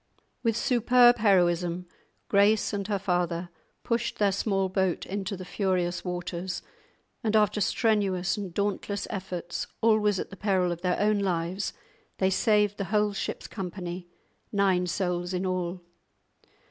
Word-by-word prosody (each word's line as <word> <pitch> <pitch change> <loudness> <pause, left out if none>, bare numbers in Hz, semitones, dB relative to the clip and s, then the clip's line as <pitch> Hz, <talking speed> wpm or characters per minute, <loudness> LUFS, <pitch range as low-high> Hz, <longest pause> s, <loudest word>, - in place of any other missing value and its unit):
With 230 -2 +1
superb 245 0 +5
heroism 180 -3 +2 0.4
Grace 205 +2 +3
and 200 -1 -2
her 205 -2 0
father 175 -2 -1 0.3
pushed 235 -1 -1
their 205 -1 +3
small 195 -1 0
boat 190 -2 0
into 195 0 -4
the 185 - -7
furious 180 -3 -1
waters, 180 0 -4 0.6
and 220 -1 +1
after 210 0 +3
strenuous 200 -5 +1
and 200 -3 -5
dauntless 200 +1 -2
efforts, 180 -3 -4
always 210 -3 +3
at - - -5
the - - -8
peril 185 -3 +1
of 170 0 -4
their 180 0 0
own 210 0 +3
lives, 185 0 -1 0.4
they 190 0 +2
saved 210 0 +2
the 200 - -2
whole 210 +1 +1
ship's - - -4
company, 180 -2 -6 0.4
nine 190 -3 +2
souls 180 +1 -1
in 180 +1 -1
all. 180 -1 -2
190 Hz, 140 wpm, -27 LUFS, 180-210 Hz, 0.6 s, superb